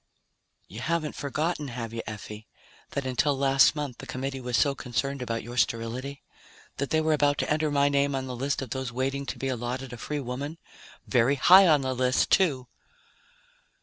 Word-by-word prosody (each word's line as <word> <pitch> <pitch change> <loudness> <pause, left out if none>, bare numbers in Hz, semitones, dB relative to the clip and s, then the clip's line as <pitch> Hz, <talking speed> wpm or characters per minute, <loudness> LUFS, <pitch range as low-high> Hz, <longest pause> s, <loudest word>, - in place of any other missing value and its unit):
"You 105 - -9
haven't 160 +2 -1
forgotten, 150 +2 -2
have 115 -3 -6
you, 115 - -3
Effie, 105 0 -8 0.5
that 140 - -2
until 135 +2 +1
last 135 +2 +4
month 145 -5 -4
the - - -9
Committee 135 +1 -4
was 125 -1 -1
so 140 -2 +3
concerned 135 +1 -3
about 115 -2 -3
your 120 +2 -8
sterility? 125 +5 -1 0.5
That 140 - -2
they 155 - +2
were 155 0 +2
about 145 -1 +2
to - - -1
enter 155 0 0
my 140 -1 +3
name 140 0 +1
on 130 -1 -2
the 130 -1 -5
list 135 +2 -1
of 125 - -9
those 130 -1 -3
waiting 135 +2 -2
to - - -4
be 135 - -3
allotted 125 +1 -4
a - - -7
free 150 +6 -4
woman? 140 +5 -5 0.5
Very 125 +2 +3
high 185 +8 +7
on 150 -4 +5
the 130 -1 -1
list, 130 0 +1
too!" 145 -10 +3
135 Hz, 190 wpm, -27 LUFS, 125-145 Hz, 0.5 s, high